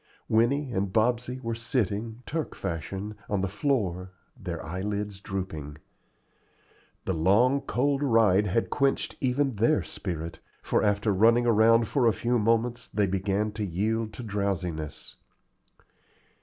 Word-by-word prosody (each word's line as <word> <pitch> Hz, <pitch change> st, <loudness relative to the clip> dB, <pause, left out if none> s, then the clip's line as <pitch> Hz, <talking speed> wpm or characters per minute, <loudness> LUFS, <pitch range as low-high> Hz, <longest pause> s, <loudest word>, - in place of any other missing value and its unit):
Winnie 125 Hz, +5 st, +2 dB
and 100 Hz, -4 st, -1 dB
Bobsey 120 Hz, +4 st, +1 dB
were 115 Hz, -2 st, -2 dB
sitting, 115 Hz, -1 st, -2 dB
Turk 160 Hz, 0 st, -3 dB
fashion, 95 Hz, +3 st, -4 dB, 0.2 s
on 105 Hz, -2 st, 0 dB
the 95 Hz, -, 0 dB
floor, 95 Hz, -5 st, -1 dB, 0.2 s
their 85 Hz, -4 st, -6 dB
eyelids 100 Hz, +3 st, -3 dB
drooping. 80 Hz, -7 st, -5 dB, 1.3 s
The 95 Hz, -, 0 dB
long 110 Hz, -, +3 dB
cold 140 Hz, +3 st, 0 dB
ride 110 Hz, -7 st, +4 dB
had 105 Hz, +5 st, 0 dB
quenched 140 Hz, -1 st, 0 dB
even 130 Hz, -2 st, +1 dB
their 120 Hz, +9 st, +3 dB
spirit, 85 Hz, -3 st, -5 dB, 0.2 s
for -, -, +1 dB
after 105 Hz, 0 st, +2 dB
running 115 Hz, +5 st, +4 dB
around 115 Hz, 0 st, +5 dB
for 125 Hz, 0 st, +2 dB
a 115 Hz, -, +4 dB
few 120 Hz, +5 st, 0 dB
moments 115 Hz, +2 st, +1 dB
they 105 Hz, 0 st, +1 dB
began 100 Hz, +2 st, 0 dB
to 110 Hz, 0 st, -4 dB
yield 110 Hz, +4 st, -1 dB
to 125 Hz, -, -7 dB
drowsiness. 95 Hz, -7 st, -3 dB
105 Hz, 130 wpm, -27 LUFS, 95-120 Hz, 1.3 s, around